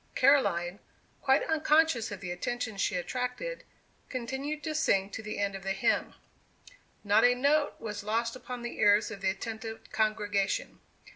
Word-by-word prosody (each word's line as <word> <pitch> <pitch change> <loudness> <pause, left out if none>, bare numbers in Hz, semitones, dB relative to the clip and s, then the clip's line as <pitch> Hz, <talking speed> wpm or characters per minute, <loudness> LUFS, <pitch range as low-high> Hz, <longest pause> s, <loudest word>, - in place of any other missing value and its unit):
Caroline, 200 -10 +3 0.4
quite 265 0 +3
unconscious 310 -6 +3
of 200 -2 -7
the 180 -2 -4
attention 225 +5 -3
she 195 0 0
attracted, 250 - -3 0.5
continued 265 +4 -4
to 310 - -2
sing 200 -10 +2
to 220 - -5
the 215 0 -5
end 200 -1 0
of 195 - -6
the 195 +1 -1
hymn. - - 0 0.9
Not 210 +1 +4
a 245 0 +6
note 285 +4 +2
was 210 -2 -5
lost 230 +3 -1
upon 250 -1 -7
the 240 - -6
ears 205 +1 +4
of 200 -3 -8
the 190 - +2
attentive 225 +3 -6
congregation. 210 -2 0
225 Hz, 155 wpm, -30 LUFS, 200-260 Hz, 0.9 s, a